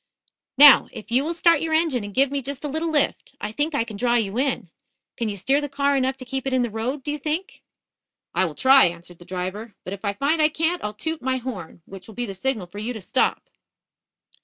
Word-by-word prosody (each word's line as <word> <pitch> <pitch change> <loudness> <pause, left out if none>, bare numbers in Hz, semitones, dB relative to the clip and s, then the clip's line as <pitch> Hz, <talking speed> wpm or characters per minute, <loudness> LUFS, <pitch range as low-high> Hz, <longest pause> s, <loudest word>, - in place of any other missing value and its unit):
"Now, 285 -1 +9
if 215 - -10
you 255 +3 +3
will 335 +3 -2
start 335 -2 +4
your 320 -1 0
engine 315 -8 +1
and 205 - -7
give 270 +5 +2
me 280 -1 -1
just 275 +2 -6
a - - -2
little 315 +3 -2
lift, 290 -2 -1
I 210 - -4
think 295 +6 -1
I 280 - +2
can 220 -3 -9
draw 240 +2 +1
you 215 -4 0
in. 260 -10 -1 0.4
Can 230 -2 -2
you 200 - -5
steer 270 +9 +1
the 290 - -4
car 280 +1 +1
enough 265 0 0
to 255 - -10
keep 265 +1 -4
it 265 - -1
in 255 -1 +2
the 240 - -3
road, 250 +6 -3
do 295 - -3
you 295 - -4
think?" 315 - -4 0.7
"I - - +2
will - - -5
try," 265 0 +6
answered 170 0 -5
the 175 - -14
driver. 185 +4 -5
"But 185 - -6
if 200 - -9
I 200 -1 0
find 285 +9 +1
I 305 - +5
can't, 325 +3 -1
I'll 210 0 -4
toot 320 +9 -4
my 260 0 0
horn, 200 -10 -7
which 190 -1 -11
will 220 - -12
be 245 - -2
the 195 - -6
signal 220 0 -2
for 175 +4 -10
you 230 +4 -3
to 220 - -7
stop." 255 +7 0
260 Hz, 255 wpm, -23 LUFS, 210-290 Hz, 0.7 s, Now